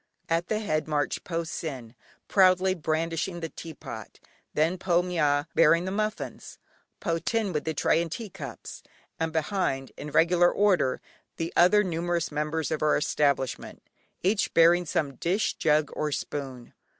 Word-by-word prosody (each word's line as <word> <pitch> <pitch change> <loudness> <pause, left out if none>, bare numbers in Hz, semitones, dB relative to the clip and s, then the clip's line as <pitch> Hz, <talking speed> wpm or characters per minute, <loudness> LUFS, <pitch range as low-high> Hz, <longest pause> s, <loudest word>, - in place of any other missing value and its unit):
At 165 +1 +1
the 215 - 0
head 155 -9 -1
marched 150 -2 -1
Po 170 -1 -2
Sin, 135 -8 -6 0.3
proudly 185 -1 +4
brandishing 165 +1 -2
the 165 -1 -4
teapot, 135 -11 -9 0.4
then 165 +4 +1
Po 175 -2 +2
Mya 150 -5 +1
bearing 165 +2 +4
the 190 - -3
muffins, 215 +2 -4 0.4
Po 165 -3 -1
Thin 220 -1 -1
with 150 - -2
the 160 -1 -2
tray 160 - +2
and 170 -2 -4
tea 225 +5 -5
cups, 135 -8 -8 0.4
and 165 0 -1
behind, 155 -5 -1
in 150 - -6
regular 170 +3 +4
order, 185 -11 +2 0.4
the 165 0 -3
other 210 +4 +5
numerous 170 -2 -1
members 150 +1 -2
of 155 - -1
our 155 0 +3
establishment, 140 -3 -1 0.4
each 195 +3 +1
bearing 170 +1 +5
some 140 -3 -1
dish, 190 +5 0
jug, 150 -1 +1
or 150 -1 -2
spoon. 135 -4 -5
165 Hz, 150 wpm, -27 LUFS, 150-180 Hz, 0.4 s, other